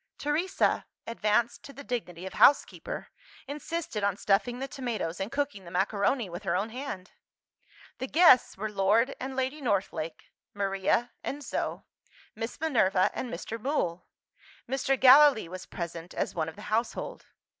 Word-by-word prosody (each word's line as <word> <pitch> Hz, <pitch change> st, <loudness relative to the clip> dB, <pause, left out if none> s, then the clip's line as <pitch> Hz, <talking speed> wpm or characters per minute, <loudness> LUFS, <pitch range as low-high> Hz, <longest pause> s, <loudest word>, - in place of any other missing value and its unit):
Teresa 325 Hz, +6 st, 0 dB, 0.2 s
(advanced 225 Hz, 0 st, 0 dB
to 280 Hz, -, -11 dB
the 280 Hz, -, -10 dB
dignity 190 Hz, -9 st, -4 dB
of 190 Hz, -, -6 dB
housekeeper) 285 Hz, -, +3 dB, 0.4 s
insisted 295 Hz, -5 st, -4 dB
on 200 Hz, -1 st, +1 dB
stuffing 215 Hz, +6 st, +1 dB
the 270 Hz, +1 st, -4 dB
tomatoes 240 Hz, -, -4 dB
and 195 Hz, +4 st, -3 dB
cooking 275 Hz, -8 st, -2 dB
the 170 Hz, -, -10 dB
macaroni 200 Hz, +6 st, +1 dB
with 175 Hz, +1 st, -7 dB
her 190 Hz, -4 st, -1 dB
own 215 Hz, +3 st, -1 dB
hand. 240 Hz, -7 st, -6 dB, 0.9 s
The 260 Hz, -, -3 dB
guests 315 Hz, -4 st, +6 dB
were 215 Hz, +2 st, -3 dB
Lord 210 Hz, +6 st, +2 dB
and 265 Hz, +1 st, -5 dB
Lady 265 Hz, +3 st, -2 dB
Northlake; 185 Hz, -, -2 dB, 0.2 s
Maria 200 Hz, +4 st, 0 dB
and 290 Hz, +1 st, -4 dB
Zo; 240 Hz, -, -3 dB, 0.5 s
Miss 225 Hz, 0 st, -5 dB
Minerva 225 Hz, -12 st, +3 dB
and 250 Hz, -, -4 dB
Mr. 220 Hz, +6 st, -6 dB
Mool. 185 Hz, -, -1 dB, 0.6 s
Mr. 270 Hz, +1 st, 0 dB
Gallilee 265 Hz, -, +7 dB
was 185 Hz, +2 st, -8 dB
present 170 Hz, 0 st, -6 dB
as -, -, -1 dB
one 160 Hz, -2 st, -1 dB
of 160 Hz, -, -12 dB
the 210 Hz, -, -11 dB
household. 240 Hz, -, -2 dB
225 Hz, 150 wpm, -29 LUFS, 190-270 Hz, 0.9 s, Gallilee